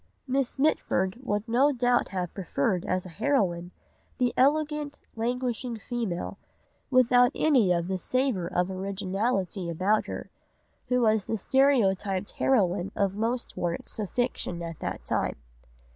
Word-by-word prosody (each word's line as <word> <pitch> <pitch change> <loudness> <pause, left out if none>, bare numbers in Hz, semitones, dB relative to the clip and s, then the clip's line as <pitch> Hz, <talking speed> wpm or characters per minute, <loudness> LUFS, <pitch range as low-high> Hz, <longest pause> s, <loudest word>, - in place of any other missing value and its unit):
Miss 265 -1 -1
Mitford 235 -8 +1
would 210 -3 -2
no 260 +6 +4
doubt 245 -2 +2
have 180 -3 -4
preferred 180 -1 -1
as 185 0 0
a - - -8
heroine 180 - 0 0.5
the 250 -2 +1
elegant 295 +2 +1 0.2
languishing 245 +1 -2
female, 220 -5 -4 0.5
without 250 -1 +5
any 255 -12 +4
of 170 -1 +1
the 190 0 -2
savour 255 -5 0
of 180 +2 0
originality 195 0 -2
about 190 +6 +1
her, - - -6 0.6
who 250 -1 +2
was 215 -2 +3
the 225 - -1
stereotyped 205 -6 +2
heroine 195 -6 +1
of 200 -1 +1
most 230 +4 -2
works 175 +5 -3
of 205 -3 -2
fiction 240 -8 -2
at 165 -1 -6
that - - -5
time. - - 0
215 Hz, 135 wpm, -27 LUFS, 185-250 Hz, 0.6 s, without